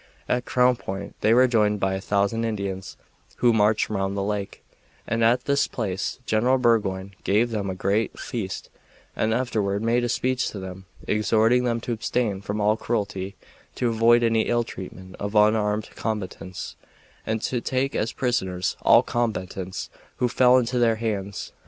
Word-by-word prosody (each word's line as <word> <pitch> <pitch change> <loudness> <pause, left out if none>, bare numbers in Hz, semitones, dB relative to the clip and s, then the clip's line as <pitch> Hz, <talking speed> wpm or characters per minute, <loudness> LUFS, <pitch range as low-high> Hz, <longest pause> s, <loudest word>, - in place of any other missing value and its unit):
At 125 0 0
Crown 125 0 +3
Point 95 -1 -6
they 110 - +3
were 125 +3 +6
joined 105 -4 +2
by 95 0 +1
1000 100 +3 0
Indians, 100 -4 -4 0.4
who 120 -1 +3
marched 105 0 +3
round 100 -1 -2
the 100 - 0
lake, 100 -1 -4 0.4
and 115 +1 0
at 120 +2 +3
this 140 0 +2
place 100 -4 -3
General 120 +4 +2
Burgoyne 100 -6 +1
gave 110 +4 +2
them 100 -3 -2
a 95 - -3
great 100 +4 0
feast 100 -6 -5 0.4
and 110 - 0
afterward 110 -4 0
made 120 +2 +2
a 120 - 0
speech 130 +2 0
to 100 - -7
them, 95 0 -8 0.2
exhorting 110 +4 +3
them 115 -1 0
to 120 - -4
abstain 115 -3 -1
from 100 +1 -3
all 105 +1 +2
cruelty, 100 -4 -3 0.4
to 120 - 0
avoid 115 +1 +4
any 115 -1 +2
ill 120 0 +2
treatment 95 -3 -9
of 100 +1 -4
unarmed 105 0 +2
combatants, 95 -4 -5 0.5
and 110 0 -2
to 125 -2 -1
take 130 +3 -1
as 110 +2 0
prisoners 95 -9 -1
all - - +6
combatants 95 -5 -3 0.2
who 125 - +1
fell 125 +1 +5
into 125 0 0
their 115 -2 +3
hands. 100 -3 -4
110 Hz, 165 wpm, -24 LUFS, 100-120 Hz, 0.5 s, were